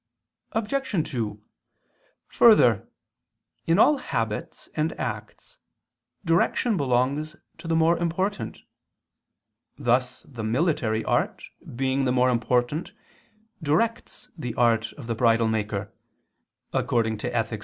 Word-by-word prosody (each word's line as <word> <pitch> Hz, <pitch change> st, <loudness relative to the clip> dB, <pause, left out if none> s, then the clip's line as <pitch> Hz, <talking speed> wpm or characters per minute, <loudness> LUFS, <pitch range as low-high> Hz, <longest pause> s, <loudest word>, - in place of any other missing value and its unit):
Obj. 225 Hz, -, -1 dB
2: 110 Hz, -5 st, -3 dB, 0.9 s
Further, -, -, +5 dB, 0.8 s
in 165 Hz, +1 st, +3 dB
all 290 Hz, +6 st, +5 dB
habits 115 Hz, -, -4 dB
and 155 Hz, +2 st, -2 dB
acts, -, -, -6 dB, 0.7 s
direction 170 Hz, +7 st, +2 dB
belongs 140 Hz, +2 st, 0 dB, 0.2 s
to -, -, -9 dB
the 165 Hz, -, +1 dB
more 165 Hz, +1 st, +3 dB
important; 185 Hz, +5 st, -2 dB, 1.1 s
thus 125 Hz, +1 st, 0 dB
the 125 Hz, -5 st, -9 dB
military 115 Hz, -2 st, 0 dB
art, -, -, 0 dB, 0.3 s
being 135 Hz, +1 st, 0 dB
the 125 Hz, -, +2 dB
more 125 Hz, 0 st, +3 dB
important, 125 Hz, +6 st, 0 dB, 0.7 s
directs 230 Hz, +10 st, -1 dB
the 125 Hz, -8 st, -5 dB
art 115 Hz, -2 st, +2 dB
of 140 Hz, -, -10 dB
the 115 Hz, -, -2 dB
bridle 115 Hz, 0 st, +3 dB
maker 105 Hz, -2 st, -2 dB, 0.8 s
[*Ethic. 115 Hz, -1 st, -1 dB
130 Hz, 100 wpm, -25 LUFS, 115-165 Hz, 1.1 s, Further